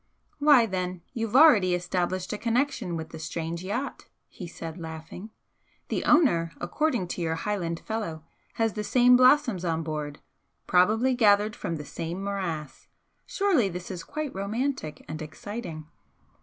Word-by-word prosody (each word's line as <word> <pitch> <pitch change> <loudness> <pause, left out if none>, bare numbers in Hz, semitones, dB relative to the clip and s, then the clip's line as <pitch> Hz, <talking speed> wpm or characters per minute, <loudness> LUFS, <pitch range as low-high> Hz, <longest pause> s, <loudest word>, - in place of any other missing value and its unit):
"Why, 285 -5 +6
then, 185 -3 -3
you've 225 -2 -3
already 225 - +7
established 180 +1 -2
a - - -2
connection 230 -6 0
with 160 0 -6
the 160 - -9
strange 165 +2 -4
yacht!" 240 +9 -4 0.2
he 180 - -9
said, 165 0 -8
laughing 160 +5 -8 0.6
"The - - -2
owner, 170 - +4
according 240 - 0
to 175 - -4
your 160 -1 0
Highland 170 -2 -3
fellow, 205 -8 -4 0.3
has 225 -2 +1
the 210 - -3
same 250 +3 +5
blossoms 255 - +4
on 165 -2 -1
board, 150 -2 -4 0.5
probably 220 +8 +3
gathered 210 -3 +4
from 165 - -4
the 150 -2 -7
same 170 +6 -5
morass! 170 -8 -4 0.4
surely 390 - +2
this 180 +1 -6
is 175 -3 -6
quite 305 -2 -5
romantic 200 - -3
and 155 +1 -6
exciting!" 155 +1 -7
185 Hz, 145 wpm, -27 LUFS, 165-235 Hz, 0.6 s, already